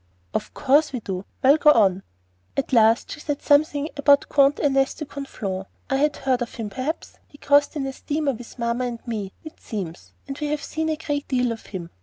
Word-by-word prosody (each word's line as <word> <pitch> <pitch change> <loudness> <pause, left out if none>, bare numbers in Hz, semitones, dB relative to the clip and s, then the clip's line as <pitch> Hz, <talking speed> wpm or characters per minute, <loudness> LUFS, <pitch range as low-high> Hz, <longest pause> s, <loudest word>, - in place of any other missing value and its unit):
"Of - - -3
course 290 +2 +3
we 250 - -2
do. 190 -3 -5 0.2
Well, 275 +3 +7
go 305 - +5
on." 195 -5 +3 0.6
"At 270 - -1
last 225 -1 +4
she - - -6
said 295 -1 -3
something 290 0 +3
about 285 0 +4
Comte 280 +1 +4
Ernest 270 -2 +2
de 305 - -5
Conflans, 205 -10 -5 0.2
I 270 - +3
had 295 +1 +2
heard 260 -2 0
of 240 - -4
him, 220 -3 -5
perhaps? 265 +8 -4
He 290 - -17
crossed 285 +2 +3
in 290 - -2
the 270 0 -3
steamer 290 0 -1
with 245 +1 -11
'Mamma 235 +1 -1
and 240 0 -6
me,' 210 -4 -4
it 315 - -11
seems; 185 -7 -6
and 275 0 -6
we 300 - -2
have 295 0 -2
seen 320 0 -2
a 315 - +1
great 290 -2 -3
deal 250 -2 +1
of 225 - -7
him. 175 -4 -7
270 Hz, 215 wpm, -23 LUFS, 230-290 Hz, 0.6 s, Well